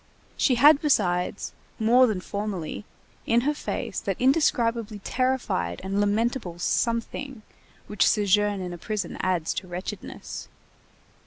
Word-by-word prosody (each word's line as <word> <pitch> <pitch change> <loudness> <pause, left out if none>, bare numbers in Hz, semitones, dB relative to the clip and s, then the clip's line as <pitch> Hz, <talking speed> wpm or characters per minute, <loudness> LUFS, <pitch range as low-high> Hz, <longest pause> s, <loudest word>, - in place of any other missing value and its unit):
She 255 - +3
had 285 +4 +7
besides, 190 - 0 0.2
more 245 +3 +5
than 205 -5 -2
formerly, 200 -3 -4 0.4
in 235 +1 +4
her 295 +4 +1
face 295 - -4
that - - -3
indescribably 235 -5 +2
terrified 255 - -1
and 195 +1 -1
lamentable 205 -3 0
something 230 +5 -1 0.4
which 210 - +2
sojourn 205 -1 +2
in 180 -1 -5
a 175 - -8
prison 205 -1 -4
adds 180 -4 0
to 185 - -5
wretchedness. 180 +1 -7
210 Hz, 125 wpm, -26 LUFS, 185-245 Hz, 0.4 s, had